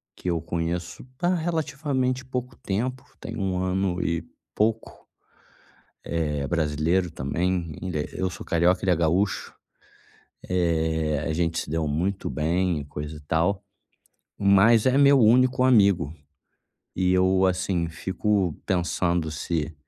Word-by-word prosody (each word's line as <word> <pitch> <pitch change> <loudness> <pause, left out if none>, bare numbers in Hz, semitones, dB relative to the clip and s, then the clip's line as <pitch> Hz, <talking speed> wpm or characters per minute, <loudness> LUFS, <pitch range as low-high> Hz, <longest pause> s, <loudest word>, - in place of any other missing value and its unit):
que 90 - -4
eu 85 -2 0
conheço 85 +5 -4
há 175 +1 +2
relativamente 140 -6 -1
pouco 125 -1 -5
tempo, 125 +6 -3
tem - - -7
1 95 -2 -1
ano 95 -1 0
e 85 0 -1 0.3
pouco. 110 +1 -1 1.0
Eh, 75 -4 -2
brasileiro 80 +2 0
também, 85 +4 -2
ainda 90 -4 -3
é 75 - -2
eu 95 - -1
sou 90 - -9
carioca, 85 +2 +2
ele 95 - +2
é - - +4
gaúcho. 85 +5 0 1.0
Eh, 80 -4 0
a 80 - 0
gente 85 +1 0
se - - -7
deu 80 0 -1
muito 90 +7 -1
bem 85 +1 0
e - - -6
coisa 75 +2 -7
e - - -11
tal. 85 +7 0 0.7
Mas 105 +4 +5
é 130 +1 +4
meu 140 -1 +6
único 125 +3 +4
amigo. 100 - +4 0.8
E 90 0 +2
eu, 95 +1 +3
assim, 90 -2 0
fico 95 +1 -1
pensando 85 -2 0
se, 80 0 -3
90 Hz, 135 wpm, -25 LUFS, 80-105 Hz, 1.0 s, meu